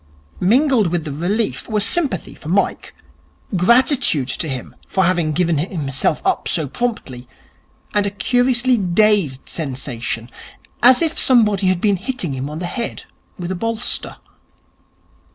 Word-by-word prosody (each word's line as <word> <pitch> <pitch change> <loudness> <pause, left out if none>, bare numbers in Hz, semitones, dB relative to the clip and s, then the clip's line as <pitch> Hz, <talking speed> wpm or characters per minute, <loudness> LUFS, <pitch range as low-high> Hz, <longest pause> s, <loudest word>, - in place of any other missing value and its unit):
Mingled 245 +2 +3
with 170 -1 -1
the 155 - -5
relief 195 +13 -2
were 215 -1 +1
sympathy 245 - +1
for 155 - -10
Mike, 195 +3 -1 0.6
gratitude 235 - +3
to 160 - -2
him 130 -2 -6
for 190 - +1
having 170 -3 +1
given 165 -1 +1
himself 145 -5 -1
up 380 -1 0
so 160 -4 0
promptly, 135 - -4 0.7
and 205 -1 +1
a - - 0
curiously 245 +3 +1
dazed 185 -7 +2
sensation, 125 -5 -4 0.5
as 255 +6 +6
if 325 -1 -1
somebody 210 -7 +3
had 185 -1 +2
been 205 -2 +2
hitting 205 - -3
him 135 +2 -4
on 150 - -6
the 175 - -4
head 235 +6 -5 0.3
with 180 0 -5
a - - -2
bolster. 230 +4 -3
190 Hz, 140 wpm, -19 LUFS, 155-235 Hz, 0.7 s, as